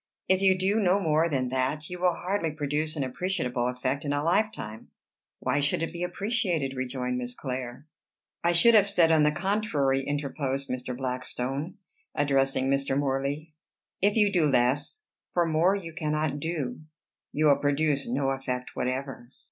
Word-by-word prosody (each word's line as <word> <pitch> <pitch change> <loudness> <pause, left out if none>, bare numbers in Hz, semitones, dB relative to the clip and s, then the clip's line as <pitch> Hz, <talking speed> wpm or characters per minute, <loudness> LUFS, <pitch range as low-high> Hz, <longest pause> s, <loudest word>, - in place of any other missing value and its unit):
"If 190 0 +3
you 190 -1 +4
do 195 +4 +1
no 195 -1 +3
more 160 -2 +2
than 130 -4 0
that, 130 +4 -1
you 180 0 -7
will 180 -1 +3
hardly 185 -2 -1
produce 150 +1 -2
an 145 - -1
appreciable 130 -4 -1
effect 130 +2 -2
in 145 - -2
a 145 0 0
lifetime." 170 - -1 0.5
"Why 130 +3 0
should 145 +3 +1
it 165 - -3
be 170 - -6
appreciated?" 180 - -1
rejoined 125 -1 -2
Miss 125 0 -5
Clare. 125 0 -5 0.6
"I 170 - +4
should 230 +8 +5
have 205 -2 +6
said, 170 -5 +4
on 160 -1 +5
the 150 0 +4
contrary," 155 -8 0
interposed 140 -1 -3
Mr. 125 -1 -4
Blackstone, 130 +4 -3 0.4
addressing 135 -2 +2
Mr. 135 0 +1
Morley, 140 +3 -2 0.5
"if 205 +2 +3
you 210 -3 +4
do 170 -5 +4
less 135 - +1 0.3
for 175 -1 +3
more 165 +4 +3
you 170 -5 -6
cannot 155 -2 -1
do 145 -5 -3 0.5
you 155 - +1
will 145 -2 +5
produce 145 -1 +1
no 135 +2 0
effect 125 -2 -4
whatever." 130 -1 -3
145 Hz, 165 wpm, -27 LUFS, 130-170 Hz, 0.6 s, have